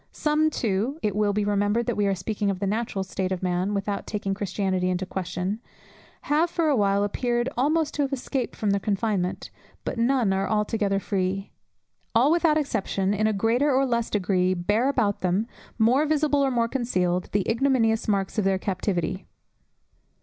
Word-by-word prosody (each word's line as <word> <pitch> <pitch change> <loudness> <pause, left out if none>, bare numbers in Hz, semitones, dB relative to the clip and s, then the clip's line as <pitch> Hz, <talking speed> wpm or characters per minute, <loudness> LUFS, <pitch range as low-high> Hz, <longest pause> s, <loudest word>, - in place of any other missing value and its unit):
Some 305 +1 +1
too 230 +1 -1
(it 210 -2 0
will 210 -1 +2
be 205 0 0
remembered 205 +3 +1
that - - -1
we 205 -1 +1
are 195 - +1
speaking 200 +2 -2
of 195 - -1
the 200 - -1
natural 205 -1 -1
state 190 0 -3
of 185 0 -3
man, 180 +3 0
without 200 0 -3
taking 200 -2 -2
Christianity 190 -2 -1
into 185 +1 -1
question) 185 +2 -3 0.6
have 310 +4 +2
for 330 -2 +1
a 290 - +3
while 200 -2 +2
appeared 240 +4 0
almost 300 +4 +1
to 295 - -1
have 275 -1 0
escaped 265 -1 -3
from 210 -2 0
their 200 - +2
confinement; 200 -2 -1 0.3
but - - -3
none 235 -4 +2
are 195 0 -1
altogether 210 -2 0
free; 195 0 -2 0.6
all 255 +6 +5
without 330 -2 +3
exception, 200 -8 -1
in 215 +1 +1
a - - +2
greater 230 +8 +2
or 270 +1 +3
less 235 -2 0
degree 185 -2 +1
bear 205 +9 +1
about 220 -7 0
them, 185 +4 +1 0.3
more 250 +7 +3
visible 300 -1 +2
or 270 - +2
more 235 -2 +1
concealed, 185 -9 -1
the 205 -2 0
ignominious 230 -2 +2
marks 200 0 0
of - - +1
their 190 0 +2
captivity. 185 -1 -2
210 Hz, 180 wpm, -25 LUFS, 195-245 Hz, 0.6 s, all